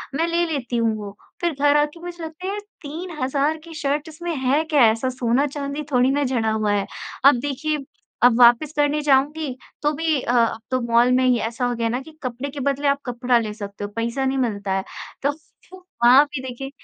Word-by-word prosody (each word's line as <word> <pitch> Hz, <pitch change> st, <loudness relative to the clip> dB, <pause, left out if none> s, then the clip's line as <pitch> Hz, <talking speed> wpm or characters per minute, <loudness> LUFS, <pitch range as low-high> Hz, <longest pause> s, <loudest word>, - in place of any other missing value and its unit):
मैं 330 Hz, +3 st, +1 dB
ले 340 Hz, +1 st, +1 dB
लेती 245 Hz, -4 st, -2 dB
हूँ 225 Hz, -1 st, +1 dB
वो। 205 Hz, -1 st, -8 dB, 0.3 s
फिर 340 Hz, -2 st, +1 dB
घर 290 Hz, 0 st, +4 dB
आ 295 Hz, -, +4 dB
के 335 Hz, -, -14 dB
मुझे 345 Hz, -1 st, -8 dB
लगता 320 Hz, +3 st, -8 dB
है 390 Hz, -, -1 dB
यार 415 Hz, -, -3 dB, 0.2 s
3000 300 Hz, -2 st, -2 dB
की 335 Hz, -1 st, -11 dB
शर्ट 290 Hz, +1 st, -2 dB
इसमें 330 Hz, +1 st, -5 dB
है 270 Hz, +4 st, +1 dB
क्या? 305 Hz, -4 st, +2 dB
ऐसा 230 Hz, +4 st, -2 dB
सोना-चांदी 280 Hz, +4 st, -1 dB
थोड़ी 250 Hz, +1 st, +3 dB
ना 285 Hz, +1 st, +1 dB
जड़ा 235 Hz, -4 st, 0 dB
हुआ 215 Hz, -1 st, 0 dB
है। 200 Hz, -1 st, 0 dB, 0.4 s
अब 275 Hz, -3 st, +7 dB
देखिए 290 Hz, +2 st, -2 dB, 0.4 s
अब 245 Hz, -1 st, +6 dB
वापस 240 Hz, +5 st, +6 dB
करने 295 Hz, +1 st, +1 dB
जाऊँगी 290 Hz, 0 st, +1 dB, 0.3 s
तो 295 Hz, 0 st, +2 dB
भी 315 Hz, -1 st, 0 dB
अ, 240 Hz, -, -2 dB
अब 230 Hz, -2 st, +2 dB
तो 255 Hz, -, +2 dB
मॉल 235 Hz, +1 st, +3 dB
में 255 Hz, +1 st, +3 dB
ही 250 Hz, -1 st, +4 dB
ऐसा 230 Hz, +3 st, -2 dB
हो 245 Hz, 0 st, -1 dB
गया 230 Hz, -1 st, -1 dB
ना 245 Hz, +3 st, -1 dB
कि 315 Hz, +2 st, -14 dB
कपड़े 255 Hz, +3 st, -4 dB
के 285 Hz, 0 st, -7 dB
बदले 280 Hz, +1 st, 0 dB
आप 280 Hz, 0 st, +2 dB
कपड़ा 245 Hz, 0 st, +1 dB
ले 215 Hz, -2 st, -4 dB
सकते 200 Hz, -1 st, -7 dB
हो, 205 Hz, -, -4 dB
पईसा 235 Hz, +4 st, -1 dB
नहीं 265 Hz, 0 st, 0 dB
मिलता 205 Hz, -6 st, -1 dB
है। 190 Hz, -, -2 dB, 0.4 s
तो 285 Hz, +1 st, +2 dB
फ -, -, -11 dB, 0.4 s
वो 370 Hz, -, -10 dB, 0.2 s
वहाँ 255 Hz, +4 st, +8 dB
भी 285 Hz, -2 st, -6 dB
देखिए 260 Hz, +1 st, -6 dB
270 Hz, 225 wpm, -22 LUFS, 240-295 Hz, 0.4 s, वहाँ